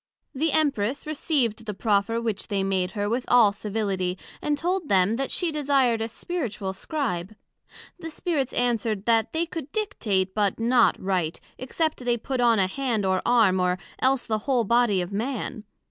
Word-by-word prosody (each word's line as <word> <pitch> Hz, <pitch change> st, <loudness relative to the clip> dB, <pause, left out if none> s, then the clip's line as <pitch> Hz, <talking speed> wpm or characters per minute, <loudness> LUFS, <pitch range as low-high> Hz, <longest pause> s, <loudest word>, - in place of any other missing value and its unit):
The 310 Hz, +4 st, 0 dB
Empress 275 Hz, -5 st, +1 dB
received 270 Hz, -7 st, 0 dB
the 210 Hz, -, -3 dB
proffer 210 Hz, +1 st, +1 dB
which 225 Hz, -3 st, -3 dB
they 200 Hz, -3 st, -1 dB
made 190 Hz, -1 st, 0 dB
her, 205 Hz, -1 st, -1 dB
with 240 Hz, +4 st, -1 dB
all 235 Hz, -4 st, +6 dB
civility; 200 Hz, -3 st, -2 dB, 0.2 s
and 295 Hz, -1 st, 0 dB
told 350 Hz, +1 st, -1 dB
them, 195 Hz, +3 st, +3 dB
that 270 Hz, 0 st, -2 dB
she 350 Hz, -3 st, 0 dB
desired 270 Hz, -6 st, +2 dB
a 225 Hz, -, -1 dB
Spiritual 225 Hz, -, -4 dB
Scribe. 215 Hz, -, -3 dB, 0.6 s
The 325 Hz, -2 st, -6 dB
Spirits 305 Hz, -5 st, -1 dB
answer'd, 225 Hz, -4 st, 0 dB
That 225 Hz, -1 st, +2 dB
they 325 Hz, +1 st, 0 dB
could 325 Hz, -4 st, -7 dB
dictate, 205 Hz, -, -1 dB
but 205 Hz, -2 st, 0 dB
not 240 Hz, +1 st, +3 dB
write, 180 Hz, -4 st, -1 dB, 0.2 s
except 275 Hz, +2 st, -2 dB
they 240 Hz, -1 st, +1 dB
put 255 Hz, +2 st, -3 dB
on 235 Hz, -2 st, +4 dB
a 195 Hz, -, +3 dB
hand 225 Hz, 0 st, -1 dB
or 190 Hz, 0 st, +1 dB
arm, 220 Hz, -6 st, +4 dB
or 180 Hz, 0 st, +1 dB, 0.2 s
else 260 Hz, -1 st, +2 dB
the 220 Hz, -1 st, -1 dB
whole 250 Hz, -3 st, +3 dB
body 235 Hz, -3 st, +3 dB
of 175 Hz, +2 st, -5 dB
Man. 220 Hz, 0 st, -3 dB
230 Hz, 175 wpm, -25 LUFS, 200-270 Hz, 0.6 s, all